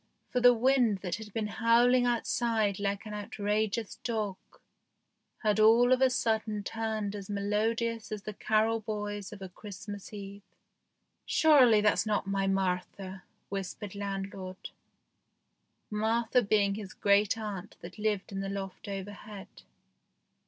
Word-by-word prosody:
For 250 - +1
the 245 0 +8
wind 240 -4 +3
that 180 0 -2
had 215 -1 -9
been 220 +1 -2 0.2
howling 245 +2 +5
outside 225 -4 +1
like 200 0 -2
an 210 - -6
outrageous 210 +1 -2
dog 215 -5 -2 1.1
had 215 0 +2
all 230 +3 +6
of 255 - +1
a 265 - +6
sudden 220 -4 0
turned 220 -2 -3
as 200 -1 -7
melodious 220 +3 -1
as 210 -2 -4
the 215 - -5
carol 220 +2 +1
boys 205 -2 -4
of 200 -2 -9
a 190 - -7
Christmas 205 +1 -9
Eve. 200 -1 -8 0.5
" - - -50 0.2
Surely 260 -9 +6
that's 210 +1 +2
not 210 -1 0
my 195 0 0
Martha," 190 0 -2 0.3
whispered 195 0 -5
landlord; 195 -2 -5 1.2
Martha 225 +3 +2
being 200 -2 +2
his 200 -2 -7
great 200 +1 +3
aunt 210 -4 -6
that 180 +5 -10
lived 210 -2 -1
in 195 - -4
the 195 0 -3
loft 195 +1 -6
overhead. 200 0 -7
210 Hz, 140 wpm, -30 LUFS, 200-225 Hz, 1.2 s, the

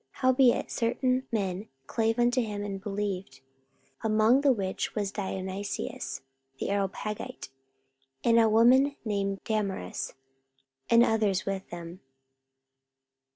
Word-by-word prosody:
44:017:034 - - -46
Howbeit 260 -1 +4
certain 255 +2 0
men 200 -2 -2 0.2
clave 225 - 0
unto 245 +1 +3
him, 210 -3 -3
and 195 -1 -5
believed: 195 -3 -4 0.6
among 220 +4 +4
the 280 -1 +5
which 195 -6 -2
was 205 -2 -1
Dionysius 190 - -4 0.4
the - - -2
Areopagite, 200 +1 -3 0.7
and 230 0 +5
a 225 -1 +5
woman 255 +6 +5
named 200 -2 -1
Damaris, 200 - -2 0.7
and 235 0 +7
others 210 -5 +1
with 195 -1 -3
them. 175 +1 -8
210 Hz, 110 wpm, -28 LUFS, 195-235 Hz, 0.7 s, and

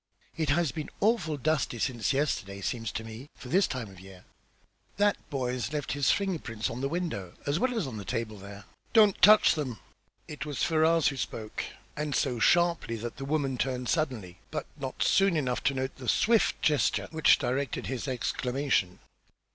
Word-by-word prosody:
"It 160 -3 -1
has 160 -1 +2
been 150 +4 -5
awful 205 -9 +1
dusty 145 -3 0
since 120 0 0
yesterday, 100 -9 -1
seems 115 +2 -3
to 110 - -4
me, 115 +5 -9
for 125 - -11
this 190 +6 +3
time 125 -5 -4
of 95 -2 -13
year. 95 -1 -14 0.7
That 205 0 +3
boy's 125 -4 -2
left 150 -2 -3
his 140 -1 +1
finger 195 -4 +1
prints 115 -5 -4
on 120 +2 -5
this 135 - -1
window, 150 - -3
as 145 +3 0
well's 245 -6 0
on 125 -5 -6
the 100 - -6
table 110 0 -3
there." 100 +1 -10 0.3
"Don't 210 -4 +5
touch 210 +3 +7
them!" 135 -8 -4 0.5
It 150 -1 -6
was 145 -3 -3
Ferrars 160 0 +3
who 135 - -6
spoke 110 -4 -4 0.3
and 150 -1 -2
so 125 -5 0
sharply 170 -3 +3
that 115 +1 -6
the 135 - -5
woman 140 -3 -1
turned 125 -2 -1
suddenly, 120 - -2
but 155 - -4
not 135 -3 -3
soon 195 -4 +3
enough 125 -4 -1
to 140 - +2
note 130 0 -3
the 125 -3 -4
swift 225 - +3
gesture 150 -2 +2
which 160 -1 +5
directed 130 +1 -2
his 130 0 -4
exclamation. 125 -5 -1
135 Hz, 180 wpm, -29 LUFS, 115-155 Hz, 0.7 s, touch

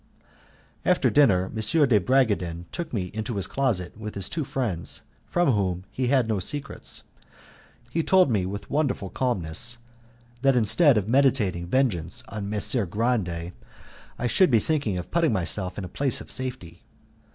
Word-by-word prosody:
After - - +2
dinner 95 -11 +3
M. 125 +8 +3
de 110 -5 +4
Bragadin 100 -8 +1
took 170 -2 -5
me 95 -6 -3
into 110 +2 -4
his 100 - 0
closet 115 -10 -1
with 105 0 -7
his 100 -2 -4
two 160 - -2
friends, 105 - -2 0.2
from 175 -5 +2
whom 95 -5 -1
he 130 -1 -2
had 130 -3 +2
no 110 -3 0
secrets. 145 +10 -3 0.9
He 165 - 0
told 185 -4 +4
me 95 -5 +1
with 100 +2 -6
wonderful 140 -10 -1
calmness 120 -2 0 0.6
that 135 -1 +4
instead 125 - +5
of 105 -1 -1
meditating 115 -9 +2
vengeance 90 -8 0
on 100 -1 -5
Messer 105 +1 +1
Grande 90 -5 -1 0.7
I 125 - -3
should 180 +9 +4
be 120 - +5
thinking 115 - -1
of 90 - -6
putting 165 -6 +2
myself 90 0 -1
in 100 - -4
a - - -5
place 135 +9 -1
of - - -8
safety. 125 -11 -3
110 Hz, 160 wpm, -25 LUFS, 95-135 Hz, 0.9 s, instead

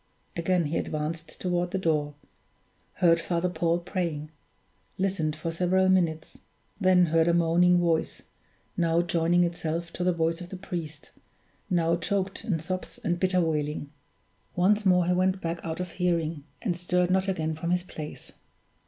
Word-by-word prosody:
Again 175 0 +1
he 150 +3 -1
advanced 155 +2 -4
toward 180 -1 0
the 190 - -2
door; 150 -5 0 0.8
heard 165 -2 +3
Father 170 +1 0
Paul 170 0 +1
praying; 170 -4 -3 0.7
listened 185 -6 0
for 160 +2 -4
several 185 +3 +2
minutes; 165 -4 +1 0.4
then 185 -2 +5
heard 165 0 +2
a 170 - +3
moaning 175 +1 +4
voice, 170 -2 0 0.5
now 170 0 +2
joining 170 0 +2
itself 170 -1 -3
to 180 - -3
the 180 - +3
voice 165 0 0
of 175 - -8
the 190 - -7
priest, 165 -5 -6 0.6
now 170 -2 +2
choked 190 +2 -2
in 185 -7 0
sobs 185 +4 -5
and 175 0 0
bitter 185 -1 +2
wailing. 150 -3 -2 0.6
Once 205 +3 +3
more 180 -1 +4
he 180 - +2
went 185 +1 +2
back 170 -1 -3
out 160 0 -4
of 180 -1 -4
hearing, 165 -4 -1 0.2
and 185 -6 0
stirred 180 +1 +1
not 190 +1 +2
again 160 -4 -1
from 160 +2 -4
his 180 0 +1
place. 155 -4 -9
170 Hz, 160 wpm, -27 LUFS, 165-180 Hz, 0.8 s, then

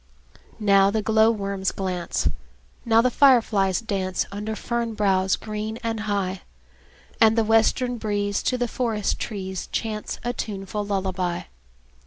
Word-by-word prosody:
Now 200 -2 +5
the 215 +1 -1
glowworms 210 -3 +2
glance, 180 - -2 0.6
Now 225 -1 +5
the 255 - +2
fireflies 225 -8 +4
dance, 190 -4 -1
Under 210 +2 -4
fern 235 -1 -2
boughs 190 -2 +2
green 215 +1 -5
and 225 -1 -2
high; 200 -3 -2 0.8
And 225 0 +6
the 225 - +4
western 225 +2 +2
breeze 205 -1 -1
To 255 - 0
the 245 0 0
forest 225 -4 -1
trees 190 -4 -5
Chants 215 -2 -3
a 240 0 -1
tuneful 205 -2 -4
lullaby. 185 -3 -2
210 Hz, 130 wpm, -24 LUFS, 195-225 Hz, 0.8 s, And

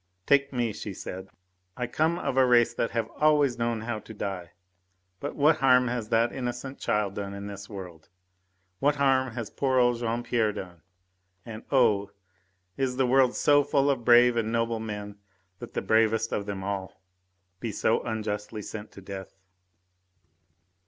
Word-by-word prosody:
"Take 140 0 +3
me!" 120 -4 -1
she 100 -1 -7
said. 95 +2 -7 0.5
"I 125 - -1
come 160 +7 0
of 135 - -2
a 135 - +5
race 120 -2 +4
that 115 - -1
have 115 -1 -2
always 145 -5 +3
known 115 -1 -1
how 115 -1 -3
to 110 - -12
die! 95 -5 -5 0.7
But 145 - -5
what 150 +2 +4
harm 125 -2 +4
has 120 -3 -3
that 115 +1 +2
innocent 130 +1 -5
child 105 -2 0
done 100 0 -5
in 100 0 -7
this 100 -1 -8
world? 90 -6 -9 0.7
What 145 +1 +2
harm 130 -3 +2
has 115 -4 -5
poor 130 -2 0
old 120 -1 +3
Jean 120 0 -2
Pierre 115 -3 +1
done, 90 -5 -8 0.6
and, 110 -1 -8
oh... 110 -7 +3 0.7
is 130 -2 -1
the 130 - +3
world 130 0 +3
so 145 0 +4
full 140 0 +2
of 125 -3 -2
brave 120 +1 +6
and 110 -1 0
noble 115 0 0
men 105 -2 -6 0.4
that - - -10
the - - -1
bravest 110 0 +2
of 100 -1 -2
them 100 -2 -4
all 95 -1 -4 0.6
be 115 0 -3
so 110 +2 +1
unjustly 105 -1 -4
sent 110 +1 -8
to 100 - -11
death?" 95 0 -8
115 Hz, 170 wpm, -27 LUFS, 105-125 Hz, 0.7 s, brave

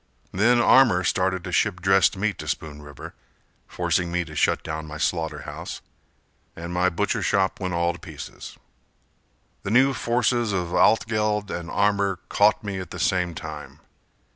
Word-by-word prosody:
Then 120 +5 +3
Armour 120 -7 +5
started 95 -1 0
to 90 - -6
ship 90 0 +1
dressed 95 +2 +3
meat 105 +1 -1
to - - -7
Spoon 75 -2 -4
River, 75 -2 -10 0.5
Forcing 90 -1 -1
me 90 0 -1
to 75 -1 -11
shut - - +1
down 80 0 -5
my 75 0 -7
slaughter 80 0 -2
house - - -7 0.8
And 85 +1 -7
my 90 +1 +2
butcher 85 - -1
shop 95 -1 +1
went 90 -2 -3
all 85 0 +1
to 85 - -12
pieces. 80 -4 -10 1.0
The - - -5
new 130 +5 +4
forces 120 -2 0
of 90 -2 -2
Altgeld 105 0 +2
and 85 0 -5
Armour 100 -1 +1
caught 105 +1 +3
me 100 -2 -4
At 95 - -7
the - - -8
same 90 -2 0
time. 75 -3 -8
90 Hz, 165 wpm, -24 LUFS, 85-105 Hz, 1.0 s, Armour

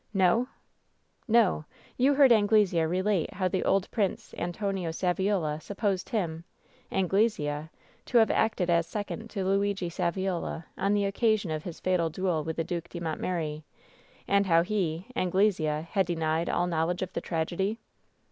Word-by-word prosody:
"No 190 +2 +4
V 250 - -2 0.8
"No. 220 -9 +3 0.3
You 275 +3 +3
heard 275 -3 +6
Anglesea 205 -6 +4
relate 185 0 0
how 185 -1 +1
the 185 +1 -1
old 195 0 +2
Prince 205 -5 -2
Antonio 185 0 -2
Saviola 180 -2 0
supposed 200 0 -2
him 170 -8 -2 0.3
— 255 0 -32
^Anglesea 180 -6 0 0.2
— - - -32
^to 245 - +2
have 225 -1 +5
acted 215 -5 +1
as 170 -1 +2
second 210 +4 -5
to 195 -4 -3
Luigi 195 -1 0
Saviola 175 -1 -2
on 195 +2 +1
the 205 -1 +1
occasion 205 -2 +1
of 155 0 -3
his 175 -3 -7
fatal 180 -3 +1
duel 170 -2 -1
with 160 +1 -4
the 165 - -1
Due 170 +1 -3
de 175 +1 -9
Montmeri, 160 -2 -3 0.7
and 200 0 +3
how 165 -1 +5
he 180 -3 -1
— - - -25
Anglesea 175 -5 +1
— - - -21
^had 195 -1 +3
denied 165 -1 -1
all 175 - +1
knowledge 170 +1 0
of 185 - -6
the - - -2
tragedy 175 +6 -1
185 Hz, 165 wpm, -28 LUFS, 165-205 Hz, 0.8 s, heard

